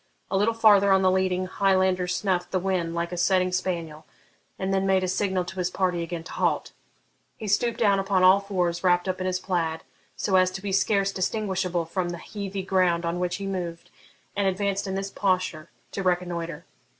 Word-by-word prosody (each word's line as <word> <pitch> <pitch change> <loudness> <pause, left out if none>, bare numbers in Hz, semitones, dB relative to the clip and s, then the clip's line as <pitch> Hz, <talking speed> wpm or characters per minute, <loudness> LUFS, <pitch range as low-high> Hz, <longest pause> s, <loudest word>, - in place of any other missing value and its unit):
A - - 0
little 210 +4 +2
farther 205 -3 +5
on 190 0 +4
the 185 - +4
leading 185 0 +1
Highlander 185 -1 +1
snuffed 180 -1 -1
the 185 - 0
wind 180 -3 -1
like 170 0 -2
a 180 - -4
setting 185 +1 +2
spaniel, 170 -4 -3 0.5
and 190 0 -2
then 195 0 +1
made 190 -1 +3
a - - 0
signal 185 -1 0
to 190 - -9
his 180 0 0
party 180 -2 0
again 170 0 -5
to - - -10
halt. - - 0 0.7
He 215 - -6
stooped 230 +4 +1
down 200 -3 +3
upon 195 -1 +1
all 185 +2 +7
fours, 180 -4 -2
wrapped 175 0 +3
up 185 0 -2
in 185 - -1
his 185 0 -1
plaid, 165 -4 -2 0.3
so 190 -2 +2
as 185 0 +4
to 190 - -6
be 200 - -3
scarce 195 0 +2
distinguishable 185 -3 -1
from 175 +2 -2
the 175 - -5
heathy 200 0 -5
ground 180 -3 +1
on 170 +1 -2
which 180 0 -1
he 200 - -5
moved, 175 -3 -5 0.4
and 200 -1 +1
advanced 200 +1 -1
in 190 - -3
this 195 0 -3
posture 185 -5 -1 0.2
to 195 - -4
reconnoitre. 175 -3 -2
185 Hz, 200 wpm, -25 LUFS, 175-195 Hz, 0.7 s, all